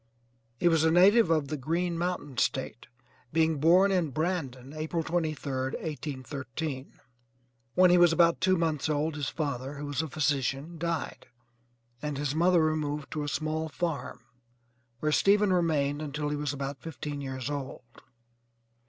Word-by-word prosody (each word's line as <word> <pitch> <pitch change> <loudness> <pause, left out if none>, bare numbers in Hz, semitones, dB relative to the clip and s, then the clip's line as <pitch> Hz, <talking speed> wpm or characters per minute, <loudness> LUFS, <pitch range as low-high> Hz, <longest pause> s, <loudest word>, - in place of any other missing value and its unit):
He - - +3
was 165 -2 +4
a 160 - +4
native 190 +4 +6
of 155 -4 +1
the 150 - -2
'Green 170 +6 -1
Mountain 165 -7 -3
State,' 130 -3 -1 0.4
being 160 -1 +2
born 180 +6 +5
at 170 -8 0
Brandon, 145 -6 -2
April 160 +2 -2
23d, 150 -6 -2
1813. 140 -1 -5 0.8
When 180 -1 +6
he 180 - +6
was 175 -1 +6
about 170 0 +3
two 185 0 +3
months 160 -3 0
old 150 +1 0
his 145 -2 -2
father, 140 -3 -3
who 145 +1 -6
was 145 0 -1
a 160 - -4
physician, 145 +2 -1
died, 170 -1 -3 0.7
and 150 -2 -3
his 145 -1 -1
mother 170 +1 +4
removed 150 -2 -1
to 155 - -3
a 145 - -3
small 155 +2 -2
farm, 165 -1 -3 0.8
where 155 - +1
Stephen 200 +3 +4
remained 150 -5 +1
until 150 0 -3
he 150 - -1
was 145 -1 -2
about 140 -1 -5
fifteen 150 -3 -6
years 130 -2 -4
old. 135 -3 -5
155 Hz, 155 wpm, -29 LUFS, 140-165 Hz, 0.8 s, native